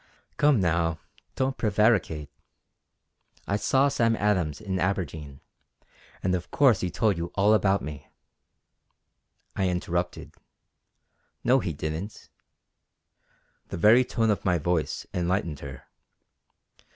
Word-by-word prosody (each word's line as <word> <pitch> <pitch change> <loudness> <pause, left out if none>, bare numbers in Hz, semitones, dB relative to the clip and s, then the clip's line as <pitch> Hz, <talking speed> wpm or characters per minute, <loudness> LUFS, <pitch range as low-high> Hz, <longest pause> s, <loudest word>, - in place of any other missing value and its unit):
"Come 145 -5 +4
now, 85 -2 +1 0.4
don't 135 0 -1
prevaricate. 105 -8 +1 1.2
I 100 - 0
saw 135 +6 +2
Sam 115 -4 +2
Adams 90 -9 0
in 95 -3 -3
Aberdeen, 80 -7 -3 0.8
and 90 - +1
of 90 -1 -3
course 130 -9 +4
he 90 - -1
told 95 +2 +1
you 85 +1 -4
all 105 +2 +4
about 100 -2 +2
me." 75 0 -8 1.5
I 95 -1 +1
interrupted: 90 0 -3 1.1
"No 130 +2 +4
he 95 -8 -3
didn't." 80 +7 -6 1.4
The - - -6
very 110 +8 +6
tone 115 -3 0
of 105 - -2
my 90 -2 +2
voice 85 0 -1
enlightened 85 -4 -1
her. 70 -2 -9
95 Hz, 115 wpm, -26 LUFS, 85-110 Hz, 1.5 s, very